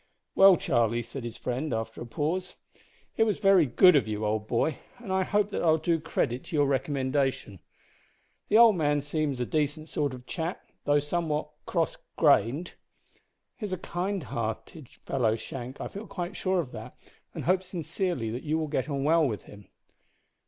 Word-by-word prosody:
"Well, 195 -2 +7
Charlie," 120 0 +1
said 115 +3 -7
his 120 0 -6
friend, 130 +5 -3
after 115 0 -5
a 120 - -6
pause, 170 +9 -2 0.6
"it 225 - +5
was 215 -2 +1
very 195 -6 +5
good 180 +9 +6
of 140 - +3
you, 105 0 -2
old 105 0 -1
boy, 130 +6 0 0.2
and 220 -6 -5
I 190 - +2
hope 205 +2 +1
that - - -2
I'll 160 -1 +4
do 165 +1 +1
credit 125 -4 -2
to 175 - -5
your 145 -1 +4
recommendation. 135 - -1 0.9
The 215 - +4
old 230 -3 +8
man 145 -3 +1
seems 145 -2 -2
a 125 - 0
decent 155 +2 -1
sort 145 -4 -1
of 125 -1 -13
chap, 165 +6 -4 0.2
though 145 0 +4
somewhat 150 0 -1 0.2
cross 165 -3 0 0.2
grained." 145 - +3 0.8
"He 215 - -4
is 185 - -2
kind 185 +1 -2
hearted, 115 +4 -5 0.5
Shank; 125 +3 -7
I - - -4
feel 205 +2 -8
quite 180 +1 -5
sure 185 -1 0
of 145 -7 -3
that, - - -9 0.4
and - - -4
hope 185 +1 +2
sincerely 175 - -3
that 120 +3 -4
you 155 +1 -1
will 160 -1 -1
get 145 0 -2
on 140 -1 -1
well 160 +1 +4
with 110 -5 -4
him." 100 -1 -14
150 Hz, 180 wpm, -28 LUFS, 125-175 Hz, 0.9 s, old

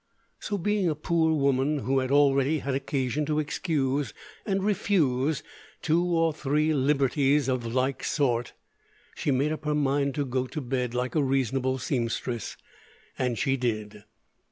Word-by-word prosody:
So, 205 - -3
being 200 0 +1
a 155 - -1
poor 160 +1 +1
woman 140 +1 +2
who 135 +1 +1
had 130 -1 -2
already 140 +1 +3
had 140 -1 -3
occasion 135 0 -1
to 150 -1 0
excuse 145 - -1 0.3
and 195 -1 0
refuse 160 -9 +1 0.4
two 165 +2 +2
or 165 -2 +2
three 150 +1 +1
"libberties" 140 0 +2
of 125 -3 -1
like 130 +2 0
sort, 120 -5 0 0.6
she - - -3
made 140 +3 +2
up 155 0 -4
her 150 0 0
mind 140 -1 +1
to 145 - -1
go 130 0 -1
to 155 - -5
bed 125 -2 -2
like 125 +1 -1
a 155 - +2
reasonable 130 -1 0
seamstress, 120 -3 -3 0.6
and 125 -3 0
she 135 +4 +1
did. 110 -4 -3
140 Hz, 155 wpm, -27 LUFS, 130-155 Hz, 0.6 s, already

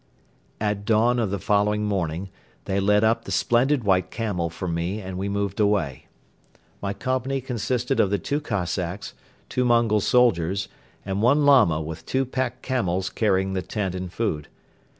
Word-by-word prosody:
At 105 -1 -1
dawn 115 +3 +3
of 110 -4 0
the 100 - -1
following 105 +1 +1
morning 95 -2 -2 0.4
they 95 0 0
led 105 +2 +3
up 110 +1 +2
the - - -6
splendid 125 +2 +2
white 95 -3 +2
camel 100 -7 -2
for 85 +2 -6
me 85 +4 -2
and 95 -2 -6
we 95 +2 -2
moved 100 0 -2
away. 100 -11 0 0.7
My 100 - -2
company 130 +5 -1
consisted 125 0 -1
of 100 - +4
the 100 - +1
two 145 +8 -2
Cossacks, 95 - -3 0.3
two 125 - 0
Mongol 115 -3 +3
soldiers 100 -6 +2 0.4
and 95 +1 -2
one 140 +6 +4
Lama 115 - +5
with 80 +1 -7
two 135 0 +1
pack 130 -1 -3
camels 95 -8 -1
carrying 95 -3 +1
the 95 - -1
tent 95 -1 -3
and 90 -1 -5
food. 80 -9 -2
105 Hz, 165 wpm, -24 LUFS, 95-120 Hz, 0.7 s, Lama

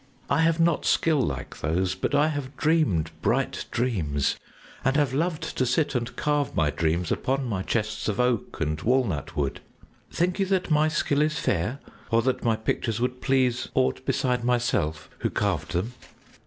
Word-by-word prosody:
I 140 - +3
have 165 0 +3
not 165 -1 +3
skill 155 -4 +3
like - - -4
those, 90 +5 0
but 95 +9 -1
I 150 +2 +4
have 145 -3 -5
dreamed 150 - +2
bright - - 0
dreams 85 - 0 0.5
and 135 +1 +2
have 145 -4 +2
loved 160 +2 -1
to - - +4
sit 135 +4 +1
and 120 -2 -2
carve 145 -2 0
my 75 -2 +2
dreams 80 +4 0
upon 135 +1 0
my 105 -6 -2
chests 110 +2 -2
of 105 0 -1
oak 125 -3 0
and 75 -1 -1
walnut 120 - 0
wood. 70 -2 -1 0.5
Think 180 +3 0
you 195 - +2
that 185 -3 0
my 155 0 +4
skill 150 -2 +1
is 155 0 +1
fair 110 - -1 0.3
or 115 0 +3
that 130 +1 0
my 115 -1 +3
pictures 110 0 -2
would 125 +1 -2
please 130 -2 +1
aught 65 0 +1
beside 125 -2 0
myself, 120 -11 0
who - - 0
carved 90 -7 -1
them?" 95 +8 -1
125 Hz, 175 wpm, -26 LUFS, 95-145 Hz, 0.5 s, I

